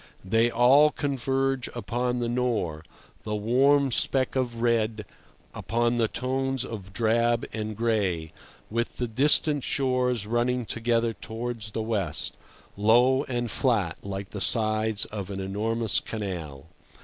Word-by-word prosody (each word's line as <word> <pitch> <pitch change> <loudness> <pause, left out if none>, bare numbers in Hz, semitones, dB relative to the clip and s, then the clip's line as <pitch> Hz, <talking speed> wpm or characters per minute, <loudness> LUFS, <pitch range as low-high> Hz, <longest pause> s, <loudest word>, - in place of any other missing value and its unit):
They 115 +5 +3
all 135 +6 +5
converge 135 -2 -1
upon 125 +1 -2
the 120 -1 -1
Nore, 115 -11 -1 0.4
the 105 -1 -3
warm 135 +6 +3
speck 130 +2 +2
of 120 -3 -1
red 115 -2 0 0.5
upon 120 +1 0
the 115 -2 +2
tones 130 +2 -2
of 100 -5 -8
drab 115 +2 +1
and 110 -1 -4
gray, 100 -9 0 0.4
with 115 +1 -2
the 125 - -1
distant 145 +4 +2
shores 125 -4 0
running 120 +2 0
together 115 0 0
towards 115 0 -5
the 110 - -2
west, 105 -8 -2 0.4
low 125 +7 +4
and 120 -3 -2
flat, - - +1
like 100 0 -6
the 100 - -5
sides 110 -1 +2
of 100 -3 -6
an 100 -1 -5
enormous 110 +4 0
canal. 85 -9 -6
115 Hz, 130 wpm, -26 LUFS, 105-125 Hz, 0.5 s, all